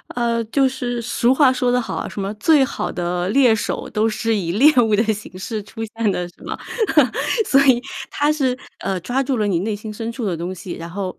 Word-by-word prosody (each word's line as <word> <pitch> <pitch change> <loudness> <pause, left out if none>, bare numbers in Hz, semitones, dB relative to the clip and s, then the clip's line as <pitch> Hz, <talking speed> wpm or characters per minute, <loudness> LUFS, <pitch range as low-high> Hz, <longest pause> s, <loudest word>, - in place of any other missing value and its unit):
呃， 235 -1 0
就 265 +4 +2
是 245 -2 -3
俗 240 +2 +2
话 265 -2 +5
说 250 -1 0
得 250 0 +2
好 - - -5
啊， - - -3
什 200 - -6
么 195 +2 -3
最 280 +6 +4
好 - - -3
的 175 0 -2
猎 245 -1 +5
手 220 - -3
都 215 +1 +1
是 225 +1 -1
以 175 -4 -2
猎 285 +9 +6
物 220 -2 +2
的 220 - +3
形 200 -3 -10
式 215 +3 -4
出 225 +2 -10
现 225 -1 -1
的 175 -1 -2
是 - - -24
吗？ - - -5 0.9
所 275 0 +4
以 245 -2 +5 0.3
她 290 +1 +1
是， 260 -4 0 0.2
呃， 195 -1 -2
抓 250 +8 -1
住 270 -1 -1
了 210 - +1
你 175 -4 +1
内 210 +2 -2
心 215 +1 -7
深 225 +1 -5
处 235 0 -6
的 175 -4 -1
东 180 +3 -4
西， 175 +1 -7
然 170 +1 -7
后， 190 0 -5
225 Hz, 250 characters per minute, -20 LUFS, 195-250 Hz, 0.9 s, 猎